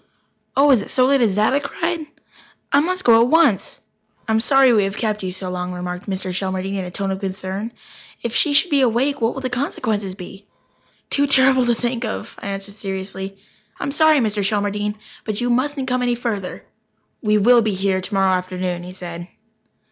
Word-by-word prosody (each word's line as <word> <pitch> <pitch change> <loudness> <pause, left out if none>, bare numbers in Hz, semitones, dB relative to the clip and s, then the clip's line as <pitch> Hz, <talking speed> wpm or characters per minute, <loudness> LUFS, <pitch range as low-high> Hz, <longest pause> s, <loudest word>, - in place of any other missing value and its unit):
"Oh, 285 +1 +6
is 245 -6 +5
it - - -8
so 255 - +3
late 275 0 +3
as 210 -5 +2
that?" 215 +5 +3
I 280 - +3
cried. 330 +3 -3 0.6
"I 280 - +5
must 365 +5 0
go 230 -1 +6
at 235 - +4
once." 300 - +2 0.5
"I'm 220 0 +2
sorry 265 +1 +5
we 210 -3 +3
have 195 +1 -4
kept 215 -2 -1
you 185 -1 -3
so 185 0 -5
long," 180 0 -3
remarked 180 +2 -5
Mr. 190 -1 -3
Shelmardine 190 +1 -2
in 185 - -3
a - - -6
tone 195 +2 -3
of 190 - -3
concern. 195 +3 -4 0.5
"If 235 - -3
she 300 - +3
should 310 +5 +4
be 280 -2 +4
awake, 260 +3 +1
what 230 +1 +1
will 270 - -5
the 255 - -2
consequences 215 -7 -2
be?" 195 +1 -11 0.6
"Too 285 0 +2
terrible 260 -2 +4
to 240 - +3
think 240 +1 -2
of," 220 - -5
I - - -7
answered 195 0 -5
seriously. 195 -1 -6 0.4
"I'm 280 - -2
sorry, 310 +1 +5
Mr. 215 -5 0
Shelmardine, 205 +1 -1 0.3
but 215 -2 -3
you 245 0 0
mustn't 270 +2 0
come 250 0 0
any 245 -1 +1
further." 220 -6 -4 0.6
"We 210 -2 +2
will 235 +3 +6
be 215 -3 0
here 190 0 0
tomorrow 195 0 +1
afternoon," 180 -1 -2
he 180 +1 -9
said. 175 -2 -7
215 Hz, 200 wpm, -20 LUFS, 190-255 Hz, 0.6 s, Oh